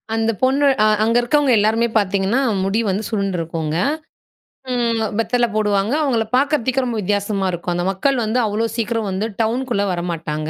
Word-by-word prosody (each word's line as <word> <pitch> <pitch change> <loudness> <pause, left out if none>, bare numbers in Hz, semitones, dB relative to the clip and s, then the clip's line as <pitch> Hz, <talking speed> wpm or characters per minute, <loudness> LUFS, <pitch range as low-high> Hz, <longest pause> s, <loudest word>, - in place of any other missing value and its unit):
அந்த 225 0 +1
பொண்ணு 275 +2 +3 0.2
அ - - +5 0.2
அங்க 230 +2 +2
இருக்கவங்க 280 +2 +2
எல்லாருமே 225 +3 +2
பார்த்தீங்கன்னா, 200 +4 +1 0.2
முடி 195 +4 0
வந்து 200 +3 -1
சுருண்டுருக்குங்க. 165 -6 -2 0.9
ம். 235 -2 0 0.2
வெத்தல 240 +1 +1
போடுவாங்க. 210 +2 +1
அவுங்கள 235 -6 +1
பாக்குறதுக்கே 265 -2 +1
ரொம்ப 235 -2 -2
வித்தியாசமா 200 0 -1
இருக்கும். 175 0 -3
அந்த 175 +1 -1
மக்கள் 265 +8 0
வந்து 225 +4 0
அவ்ளோ 215 +2 -1
சீக்கிரம் 225 -2 -1
வந்து 195 +4 -2 0.2
டவுனுக்குள்ள 230 -2 0
வரமாட்டாங்க. 165 -3 -3
220 Hz, 150 wpm, -19 LUFS, 195-240 Hz, 0.9 s, அ